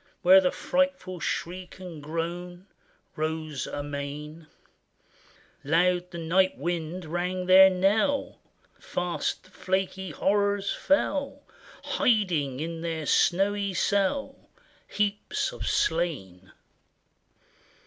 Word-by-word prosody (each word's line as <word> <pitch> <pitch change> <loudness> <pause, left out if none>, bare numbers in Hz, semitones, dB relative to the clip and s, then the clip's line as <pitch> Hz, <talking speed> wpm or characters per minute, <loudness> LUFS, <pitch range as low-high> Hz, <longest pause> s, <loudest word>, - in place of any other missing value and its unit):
Where 190 +2 +8
the 180 - +2
frightful 275 -10 -1
shriek 180 +2 -4
and 180 -5 -9
groan 175 +4 -5 0.5
Rose 155 -2 -3
amain: 145 +2 -6 1.2
Loud 180 +4 +2
the 175 - -8
night 180 +3 +2
wind 170 +3 -3
rang 180 +3 -2
their 190 +1 +8
knell; 205 +9 +1 0.4
Fast 175 -1 -3
the 185 - -21
flaky 190 0 -2
horrors 200 +4 +1
fell, 285 -1 0 0.4
Hiding 170 - +1
in 165 +1 -4
their 165 -2 -3
snowy 200 +4 +2
cell 200 +9 -1 0.4
Heaps 210 - -1
of - - -6
slain 110 - -1
180 Hz, 95 wpm, -27 LUFS, 160-195 Hz, 1.2 s, Where